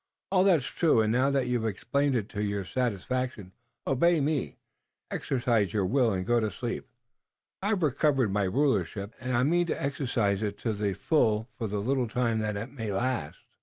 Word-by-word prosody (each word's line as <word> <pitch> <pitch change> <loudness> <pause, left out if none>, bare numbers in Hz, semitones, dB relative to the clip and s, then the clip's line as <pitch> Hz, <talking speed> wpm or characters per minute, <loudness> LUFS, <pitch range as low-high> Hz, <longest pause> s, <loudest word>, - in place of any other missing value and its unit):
"All 185 -1 +4
that's 175 -9 +4
true, 155 -6 +2
and 110 0 +1
now 130 +4 +3
that 135 -2 +1
you've 125 -2 0
explained 135 +6 0
it 110 -4 -1
to 105 - -4
your 100 -2 -2
satisfaction, 125 -2 -2 0.3
you - - +1
obey 170 +5 +3
me, 140 - -1 0.5
exercise 120 -6 0
your 100 -3 +1
will 120 +3 +2
and 90 -2 -2
go 120 +1 +3
to 110 -1 0
sleep. 120 +2 -5 0.7
I've 200 -2 0
recovered 140 -5 +2
my 100 -1 +1
rulership, 100 - 0
and 130 -1 -1
I 125 - +3
mean 170 +5 +2
to - - -2
exercise 120 -8 0
it 105 -1 -2
to 115 - 0
the 100 -1 -1
full 110 -8 +1
for 115 - -3
the 105 0 -3
little 125 +3 0
time 115 -1 0
that 105 -1 -2
it 115 +5 -5
may 115 -6 -4
last." 115 - -2
120 Hz, 190 wpm, -28 LUFS, 105-135 Hz, 0.7 s, All